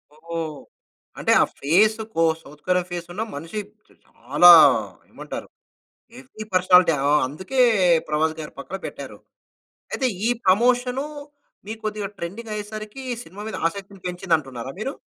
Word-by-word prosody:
ఓహ్! 160 -1 -6 0.6
అంటే, - - +1
ఆ - - +6 0.2
ఫేస్ 205 +10 +3 0.2
కో 165 - +3 0.2
south 150 0 -16
Korean 180 -1 +1
face 175 -1 -5
ఉన్న, 205 - -4
మనిషి 165 +8 -5 0.5
చాలా 175 0 +4 0.6
ఏమంటారు! - - -8 0.7
Heavy 255 -4 -10
personality. 180 -2 +5 0.2
ఆ! - - +3 0.2
అందుకే, 185 - -3 0.5
'ప్రభాస్' 155 +1 0
గారి 150 - -8
పక్కన 175 +7 -6
పెట్టారు. - - -9 0.7
అయితే 260 - 0 0.2
ఈ - - +2 0.2
ప్రమోషను, 245 +7 +2 0.6
మీకు 220 +1 -6
కొద్దిగా 210 -1 -3
ట్రెండింగ్ 215 +7 -7
అయ్యేసరికి, 215 +4 -7 0.2
సినిమా 195 +5 -10
మీద - - -5
ఆసక్తిని 195 +2 -9
పెంచింది 180 -1 0
అంటున్నారా 135 -3 -7
మీరు? 270 +6 -3
185 Hz, 130 wpm, -23 LUFS, 165-215 Hz, 0.7 s, ఆ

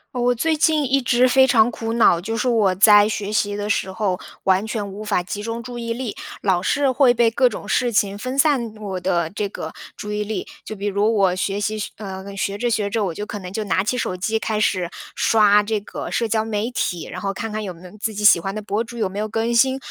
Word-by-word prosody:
呃， 245 - -1
我 245 0 +3
最 315 +7 0
近 310 -1 +2
一 275 0 +3
直 250 0 +3
非 265 +1 +5
常 235 -3 +4
苦 225 -1 -4
恼， 225 -7 +4
就 225 +5 -3
是 255 - -1
我 220 -6 +3
在 205 +2 +6
学 210 -1 -3
习 205 -1 +1
的 205 0 -3
时 190 -2 0
候， 190 -2 -1 0.3
完 190 +2 +2
全 220 -3 -4
无 210 +2 -7
法 205 -4 0
集 205 +3 -6
中 230 +1 -4
注 245 0 -8
意 230 -1 -4
力， 235 -2 -4 0.3
老 185 -3 +2
是 280 +8 +1
会 260 -1 +4
被 235 -1 +3
各 250 +2 +3
种 205 - -8
事 245 +3 +1
情 200 -2 +1
分 255 +5 -4
散 270 -7 +2
我 200 -3 -5
的 170 -3 0
这 205 +2 -3
个 - - -7 0.2
注 210 0 -5
意 210 0 -1
力。 210 -3 -4 0.2
就 - - -7
比 205 -1 -6
如 205 +2 +1
我 195 -4 +2
学 195 +2 -2
习 215 +1 -2
学 210 - -4
呃， 195 -1 -7
学 200 +1 -2
着 240 +3 -1
学 210 -3 0
着， 215 +1 -1
我 185 -4 -2
就 205 +5 -5
可 205 - -6
能 180 -2 -8
就 215 +2 -3
拿 190 -1 +1
起 250 +5 -1
手 185 - -2
机 215 +5 -1
开 220 -1 -2
始 185 -5 0 0.3
刷 210 -2 +4
这 210 0 -2
个 - - -7
社 230 -2 -1
交 220 0 +1
媒 220 +2 -2
体， 175 -8 -3
然 - - -6
后 195 -1 -2
看 225 +3 -5
看 215 +1 -3
有 195 -4 -5
没 170 +2 -15
有 180 - -11
自 220 +1 -3
己 210 0 -5
喜 205 -4 +7
欢 195 +4 -4
的 215 - -4
博 210 +1 -2
主 235 +1 -10
有 215 -4 0
没 195 +2 -6
有 215 - -1
更 225 +2 -1
新。 260 +3 +3
215 Hz, 285 characters per minute, -21 LUFS, 200-235 Hz, 0.3 s, 喜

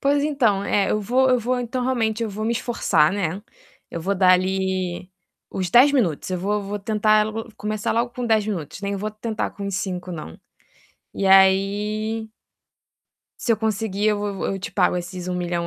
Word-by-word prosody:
Pois 285 +1 +2
então, 235 -10 +2
é, 200 -1 +1
eu 215 - +1
vou 250 +6 +2
eu 250 - +4
vou 250 +2 -1
então, 245 +1 -3
realmente, 230 -3 0
eu 225 - -1
vou 215 +2 -4
me 230 - +1
esforçar, 235 -9 +2
né, 190 -1 -2 0.5
eu 170 - -5
vou 195 +4 -1
dar 185 -1 +5
ali 185 -1 -1 0.4
os 185 -2 -3
10 260 +7 +6
minutos. 190 - 0
Eu 185 - -1
vou 205 +3 -1
vou 200 +1 -4
tentar 215 +1 +2 0.3
começar 210 0 -2
logo 235 +2 0
com 245 0 -4
10 220 -2 +2
minutos, 185 -5 -5
nem 200 0 -2
vou 210 +2 -3
tentar 215 0 -3
com 200 - -7
os 195 -2 -2
5 180 -2 -4
não. 155 - -8 0.8
E 195 - -1
aí 205 +3 +3 1.1
se - - -1
eu 230 - +4
conseguir, 215 -1 -1
eu 210 -1 +1
vou 205 -1 -3
vou 195 - -3
eu 195 - -4
te - - -5
pago 180 -2 +2
esses 180 0 -7
1 180 - -2
milhão 175 -1 -2
205 Hz, 195 wpm, -22 LUFS, 190-220 Hz, 1.1 s, 10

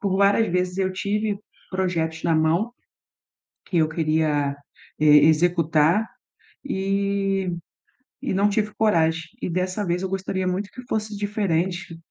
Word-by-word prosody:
por 190 -2 0
várias 200 +2 +4
vezes 180 0 0
eu 190 -1 0
tive 205 +2 -1 0.3
projetos 170 -4 -1
na 165 -1 +2
mão 165 +9 +2 1.0
que 175 - -1
eu 155 -1 +4
queria 155 -3 0 0.4
e 155 - +3 0.2
executar, 165 +3 +3 0.6
e 195 -4 0 0.7
e 270 -8 -1
não 200 +2 +3
tive 210 0 0
coragem. 165 -7 +2 0.2
E - - -1
dessa 185 +3 -1
vez 175 +1 -1
eu 190 - -2
gostaria 190 0 -2
muito 190 +2 -2
que 250 - -9
fosse 215 -1 -2
diferente, 190 -4 -1
185 Hz, 135 wpm, -23 LUFS, 165-200 Hz, 1.0 s, várias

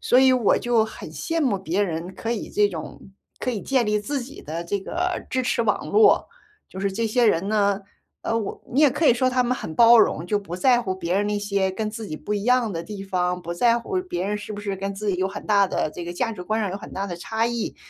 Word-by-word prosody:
所 250 - +4
以 260 0 +6
我 245 -5 +3
就 240 -2 +2
很 220 - -9
羡 330 0 -3
慕 205 -8 +1
别 185 +4 -1
人 175 0 -3
可 230 +1 -3
以 225 - -4
这 210 0 +3
种 160 -3 -7 0.4
可 255 - -2
以 220 -5 -3
建 260 -3 +1
立 210 0 +1
自 275 +5 -3
己 275 +4 -10
的 165 +3 -5
这 200 +3 -2
个 360 - -2
支 260 0 0
持 245 - 0
网 210 -2 0
络。 425 0 +5 0.4
就 190 - -7
是 200 0 0
这 225 +4 -1
些 235 +2 +2
人 195 0 +2
呢， 200 -2 +2 0.4
呃， 225 - 0
我 210 - -5
你 275 - +2
也 300 - +7
可 290 +5 -1
以 - - +7
说 255 +2 +1
他 255 0 +2
们 250 +1 0
很 160 - -6
包 235 +4 +7
容， 165 -6 +3
就 210 +2 +1
不 180 -3 -7
在 245 +4 +4
乎 190 -5 -2
别 175 -1 -2
人 205 - 0
那 210 0 0
些 200 -2 0
跟 215 +2 -3
自 220 -1 -6
己 155 - -5
不 210 - -5
一 205 0 -2
样 250 -4 +3
的 165 0 -4
地 200 +2 -7
方， 180 -2 -1
不 170 - -4
在 235 +6 +3
乎 370 +10 -2
别 190 - -3
人 210 0 -1
是 210 0 -7
不 205 - -6
是 200 -1 -2
跟 195 +1 -4
自 210 +1 -4
己 180 - -1
有 190 +1 0
很 195 - -8
大 200 -2 +4
的 155 - -1
这 175 - -7
个 175 - -6
价 225 +4 -1
值 180 - -7
观 215 +4 -1
上 195 - -1
有 195 - -4
很 - - -10
大 195 +1 -2
的 175 - -5
差 220 +5 -1
异， 235 -1 -3
210 Hz, 295 characters per minute, -24 LUFS, 190-240 Hz, 0.4 s, 也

